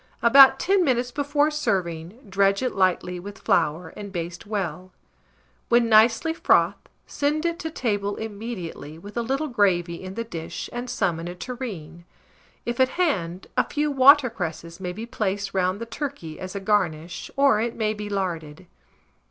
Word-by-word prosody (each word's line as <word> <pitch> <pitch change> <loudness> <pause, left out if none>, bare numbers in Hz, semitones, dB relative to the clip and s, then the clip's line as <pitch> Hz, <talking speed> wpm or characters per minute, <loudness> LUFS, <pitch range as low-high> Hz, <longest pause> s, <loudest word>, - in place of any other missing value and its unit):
About 265 +3 +8
10 385 0 +3
minutes 250 -4 +1
before 290 +2 +1
serving, 185 - -2
dredge 195 +2 +2
it 255 - -1
lightly 180 -1 +1
with 200 +3 -9
flour, 160 0 +1
and 205 -1 -9
baste 170 0 -5
well; 185 -4 -3 0.8
when 235 -1 +4
nicely 225 +8 +5
frothed, 330 - +2 0.2
send 300 +3 -1
it 335 0 -1
to 320 - -4
table 205 -9 -1
immediately, 200 -9 -6
with 205 +5 -11
a 235 - 0
little 270 +6 -1
gravy 180 - +1
in 190 0 -8
the 230 - -2
dish, 170 -6 -6
and 245 +1 -5
some 175 -8 0
in 165 - -6
a 175 - -6
tureen. 190 -8 -7 0.6
If 240 +1 -3
at 260 0 +5
hand, 190 - 0
a - - +4
few 295 0 0
water 275 -1 +6
cresses 170 -3 -5
may 180 -1 -4
be 220 +5 -6
placed 200 -3 -2
round 185 +1 0
the 230 - -4
turkey 230 - -6
as 185 +1 -7
a - - -2
garnish, 180 -5 -1
or 275 -6 +4
it 235 0 -2
may 215 -1 0
be 210 -1 -6
larded. 175 -4 -4
205 Hz, 170 wpm, -24 LUFS, 180-245 Hz, 0.8 s, About